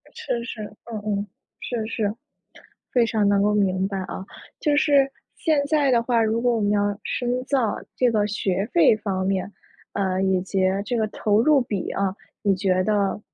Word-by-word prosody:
是 250 - -3
是， 225 -2 -6 0.2
嗯 225 -3 -6
嗯， 205 -1 -1 0.3
是 235 -3 -3
是， 215 -2 -1 0.8
非 245 -2 +4
常 215 -3 +1
能 200 0 +3
够 210 +1 +2
明 190 -2 +1
白 195 0 -3
啊。 190 0 -5 0.4
就 295 -2 +2
是， 280 -2 +4 0.3
现 310 -4 +2
在 290 -2 +2
的 235 -2 +3
话， 235 -1 +2
如 225 +1 +1
果 245 -1 +2
我 - - -1
们 205 -1 +1
要 205 0 +1
深 250 +1 -1
造， 255 -6 +1 0.2
这 250 -1 +3
个 210 -2 +2
学 195 -1 -1
费 170 +5 +5
方 190 -3 -2
面， 195 +1 -1 0.4
呃， 190 -1 0
以 190 -1 +2
及 190 +1 -2 0.3
这 240 - -1
个 220 - +1
投 210 0 +1
入 295 +1 +5
比 210 -6 -3
啊， 195 0 -1 0.3
你 200 -2 +3
觉 185 -1 +1
得 205 0 0
210 Hz, 200 characters per minute, -23 LUFS, 195-240 Hz, 0.8 s, 费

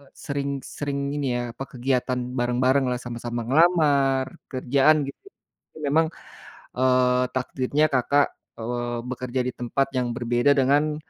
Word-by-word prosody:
sering 140 -2 -4
sering 140 -1 -4
ini, 145 -2 -2
ya 120 - -1
apa 130 +3 -7
kegiatan 125 0 0 0.2
bareng-bareng 125 +2 +2
lah 125 - 0
sama-sama 120 -1 -4
ngelamar 140 -2 +3
kerjaan 140 +4 +3
gitu. 140 - -9 0.5
Itu - - -12
memang, 160 +3 +3 0.7
eee, 125 -1 +3
takdirnya, 130 +4 +1
Kakak, 140 +3 +3 0.3
eee, 120 +1 -3
bekerja 130 0 -3
di - - -3
tempat 125 +3 -1
yang 125 -1 +1
berbeda 120 +2 +2
dengan, 145 +3 +2
130 Hz, 130 wpm, -24 LUFS, 125-140 Hz, 0.7 s, ngelamar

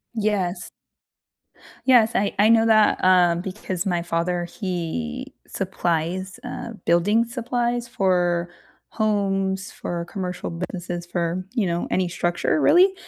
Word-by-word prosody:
Yes. 200 -4 -1 1.2
Yes, 240 -4 +6
I 200 0 +1
I 210 - +6
know 225 0 +5
that, 215 -3 +4
um, 175 -2 +4
because 185 -1 -4
my 175 -2 0
father, 175 +1 -1
he 230 +9 -4
supplies, 180 0 -2
uh, 230 - -6
building 205 +7 +3
supplies 240 0 -2
for 175 -4 +1 0.4
homes, 195 -3 0
for 170 -1 -4
commercial 180 -1 -5
businesses, 175 0 -5
for, 175 +1 -2
you 220 -7 +1
know, 170 0 -1
any 185 -1 +1
structure 175 - 0
really, 360 +6 +6
185 Hz, 120 wpm, -23 LUFS, 175-220 Hz, 1.2 s, Yes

